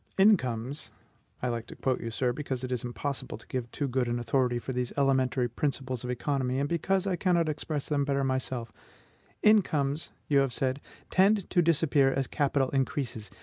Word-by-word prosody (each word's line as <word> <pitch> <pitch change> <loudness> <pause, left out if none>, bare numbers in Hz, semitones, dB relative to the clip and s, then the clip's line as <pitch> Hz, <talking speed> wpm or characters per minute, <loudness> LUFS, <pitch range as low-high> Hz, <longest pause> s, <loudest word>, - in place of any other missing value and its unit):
"Incomes" 130 - +2 0.5
(I 125 - +1
like 115 -1 -3
to - - -9
quote 130 -1 -1
you, 115 - -3
sir, 125 +2 0
because 130 -2 -4
it 130 - -4
is 125 -2 -1
impossible 130 +1 -4
to 115 - -16
give 125 -2 -4
too 145 - -2
good 125 -1 0
an 120 0 0
authority 120 +1 +1
for 130 +2 -4
these 125 -1 -2
elementary 130 -2 +2
principles 130 0 -2
of 125 - -4
economy, 130 0 -1
and 140 +1 +1
because 185 +4 0
I 190 -2 +1
cannot 175 -2 +2
express 150 -1 -3
them 145 -2 +1
better 140 -1 0
myself), 130 -3 -2 0.7
"incomes," 155 -9 +3 0.2
you 140 -2 +4
have 135 -2 +1
said, 130 +1 -1 0.3
"tend 195 +1 +4
to 175 - +4
disappear 155 -4 +3
as 135 0 0
capital 140 -1 +1
increases. 130 -6 -2
135 Hz, 185 wpm, -29 LUFS, 125-150 Hz, 0.7 s, you